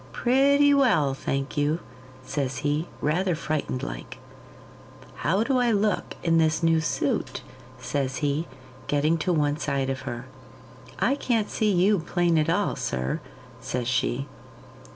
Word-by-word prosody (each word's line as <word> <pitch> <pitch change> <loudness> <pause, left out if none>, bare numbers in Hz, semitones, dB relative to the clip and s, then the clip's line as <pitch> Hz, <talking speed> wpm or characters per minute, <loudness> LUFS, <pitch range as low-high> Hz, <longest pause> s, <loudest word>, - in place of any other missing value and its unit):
'Pretty 280 +3 +4
well, 220 - +3
thank 135 0 -3
you,' 145 +2 +1 0.5
says 130 -4 -2
he, 150 +3 0
rather 175 +4 +1
frightened 155 -5 -3
like. - - -6 1.0
'How 190 +8 +1
do 260 +1 +1
I 245 -1 +3
look 210 -1 0
in 165 -1 +3
this 160 +1 +2
new 165 -1 +4
suit?' 160 - -1 0.3
says 135 -2 -2
he, 145 +4 -1 0.4
getting 150 +3 +2
to 180 - 0
one 150 -3 +1
side 135 -2 -1
of 135 - -4
her. 120 +1 -6 0.7
'I 265 - +2
can't 225 -6 0
see 215 -1 +1
you 190 +2 +3
plain 170 0 +1
at 155 - +1
all, - - +1
sir,' 65 +1 -2 0.4
says 125 -2 -3
she. 130 +1 0
155 Hz, 140 wpm, -26 LUFS, 140-200 Hz, 1.0 s, Pretty